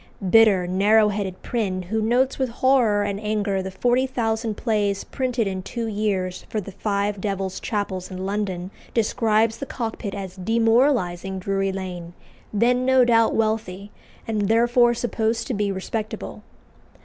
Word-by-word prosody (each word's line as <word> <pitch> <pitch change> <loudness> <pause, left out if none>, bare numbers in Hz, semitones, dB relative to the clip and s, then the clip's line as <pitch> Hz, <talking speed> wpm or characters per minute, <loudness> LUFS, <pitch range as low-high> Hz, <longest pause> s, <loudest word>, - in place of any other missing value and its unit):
Bitter, 215 -5 +6
narrow 210 +4 +4
headed 195 -3 -4
Prynne, 195 -6 -2
who 220 +5 -2
notes 250 +5 +1
with 260 -2 0
horror 230 -4 +3
and 200 -1 -2
anger 210 -2 -1
the 190 - -5
forty 245 +7 +1
thousand 225 -3 -1
plays 205 -4 0
printed 250 -4 -1
in 190 -1 -3
two 230 +5 -4
years 200 -4 -2
for 215 - -2
the 195 -1 -7
five 200 0 -2
Devil's 195 -2 -3
chapels 200 -4 -3
in 185 0 -5
London, 195 -2 -3 0.2
describes 225 -1 +2
the 275 - -5
Cockpit 225 -4 -4
as 190 -1 -7
demoralising 225 -3 +1
Drury 195 +1 -1
Lane, 180 -3 -6 0.4
then 245 +4 +2
no 260 -1 +5
doubt 230 -2 +3
wealthy, 215 -3 -1 0.4
and 210 -3 0
therefore 240 +1 +4
supposed 230 -1 -1
to - - -3
be 205 -2 0
respectable. 210 +3 -5
210 Hz, 150 wpm, -23 LUFS, 195-230 Hz, 0.4 s, Bitter